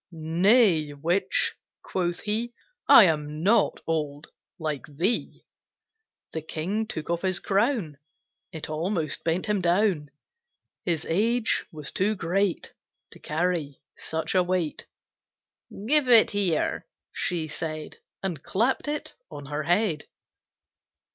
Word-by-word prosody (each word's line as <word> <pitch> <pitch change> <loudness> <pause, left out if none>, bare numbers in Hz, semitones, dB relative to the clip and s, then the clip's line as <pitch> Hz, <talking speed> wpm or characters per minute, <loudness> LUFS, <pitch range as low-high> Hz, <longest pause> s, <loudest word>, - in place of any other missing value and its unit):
"Nay, 165 0 +3
Witch!" 175 +6 +1 0.3
quoth 175 -2 -2
he, 230 +3 -2 0.3
"I - - +10
am 150 -3 0
not 215 +5 +3
old 150 -2 -3 0.3
like 155 -4 -4
thee." 170 +11 -2 0.9
The 160 - -4
King 185 +8 -3
took 160 -5 -4
off 170 0 -1
his 185 -2 0
crown, 200 - 0 0.5
It 160 -4 -6
almost 160 0 -2
bent 170 +2 0
him 210 -3 0
down; 175 -4 +1 0.8
His 170 -4 -1
age 225 +7 +1
was 150 -3 -6
too 210 +3 0
great 185 +1 -1 0.4
To - - -14
carry 160 -3 -2 0.2
such 160 0 -3
a 185 - +4
weight. 180 -3 -2 1.0
"Give 290 +2 +4
it 230 -2 +7
here!" 195 -6 0 0.2
she 165 -3 -2
said, 155 0 -5 0.3
And 175 -7 -3
clapt 235 +9 0
it 295 0 -3 0.2
on 145 - -9
her 145 +2 -3
head. 175 -2 +1
175 Hz, 120 wpm, -26 LUFS, 155-205 Hz, 1.0 s, I